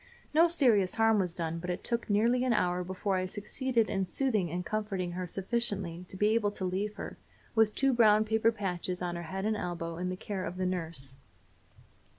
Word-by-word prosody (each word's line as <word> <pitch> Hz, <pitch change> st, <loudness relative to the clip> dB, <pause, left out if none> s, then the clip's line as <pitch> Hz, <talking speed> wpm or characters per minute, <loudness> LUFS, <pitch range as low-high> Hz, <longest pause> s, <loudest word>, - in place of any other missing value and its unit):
No 330 Hz, +3 st, +6 dB
serious 240 Hz, -, +3 dB
harm 225 Hz, -1 st, +4 dB
was 180 Hz, -3 st, -1 dB
done, 165 Hz, -1 st, -3 dB
but 180 Hz, +2 st, -6 dB
it 180 Hz, -, -3 dB
took 235 Hz, -1 st, -1 dB
nearly 230 Hz, +5 st, +3 dB
an 255 Hz, -2 st, +2 dB
hour 180 Hz, -4 st, +1 dB
before 190 Hz, +2 st, -1 dB
I 185 Hz, 0 st, -1 dB
succeeded 225 Hz, +4 st, -1 dB
in 195 Hz, -1 st, 0 dB
soothing 215 Hz, -3 st, +1 dB
and 175 Hz, +2 st, -3 dB
comforting 200 Hz, -4 st, -2 dB
her 180 Hz, +1 st, -4 dB
sufficiently 195 Hz, -3 st, -2 dB
to 190 Hz, -, -7 dB
be 210 Hz, +2 st, +3 dB
able 220 Hz, -2 st, +2 dB
to 190 Hz, -, -3 dB
leave 200 Hz, +3 st, -2 dB
her, -, -, -7 dB, 0.3 s
with 220 Hz, -2 st, +3 dB
two 270 Hz, -1 st, +3 dB
brown 215 Hz, -2 st, +5 dB
paper 220 Hz, +1 st, +3 dB
patches 185 Hz, -4 st, -3 dB
on 175 Hz, -1 st, -2 dB
her 170 Hz, -, -4 dB
head 190 Hz, +1 st, -3 dB
and 215 Hz, 0 st, +1 dB
elbow, 170 Hz, -4 st, -4 dB
in 180 Hz, +1 st, -2 dB
the 185 Hz, -, -2 dB
care 195 Hz, -2 st, -4 dB
of 180 Hz, +1 st, -5 dB
the 185 Hz, -, -1 dB
nurse. 165 Hz, -7 st, -2 dB
195 Hz, 205 wpm, -30 LUFS, 180-220 Hz, 0.3 s, No